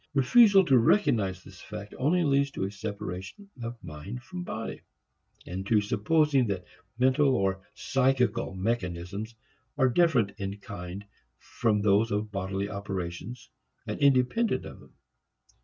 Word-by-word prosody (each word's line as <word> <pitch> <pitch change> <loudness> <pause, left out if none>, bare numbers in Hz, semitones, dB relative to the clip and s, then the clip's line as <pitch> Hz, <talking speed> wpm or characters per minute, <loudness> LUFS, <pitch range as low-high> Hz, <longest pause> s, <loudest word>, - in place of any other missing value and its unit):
Refusal 195 - +6
to 130 -5 +5
recognize 105 - +2
this 95 +3 -14
fact 105 0 -8
only 165 +7 +2
leads 140 -1 +2
to 135 - -4
a 95 - -2
separation 100 - -7
of 120 +1 -5
mind 90 +10 -8
from 180 +2 -7
body, 115 -9 -5 0.6
and 90 +2 -5
to 110 0 +4
supposing 135 +6 +2
that 95 -3 -3 0.3
mental 130 +2 +3
or 95 -1 0
"psychical" 125 -3 +1
mechanisms 100 +1 -3 0.4
are 130 -2 +4
different 125 - +3
in 100 0 -4
kind 100 0 -8 0.3
from 105 -3 0
those 105 +2 +3
of 105 0 -2
bodily 100 0 -2
operations 100 +3 -6 0.3
and - - -4
independent 140 - +2
of - - -10
them. - - -18
110 Hz, 135 wpm, -28 LUFS, 100-135 Hz, 0.6 s, Refusal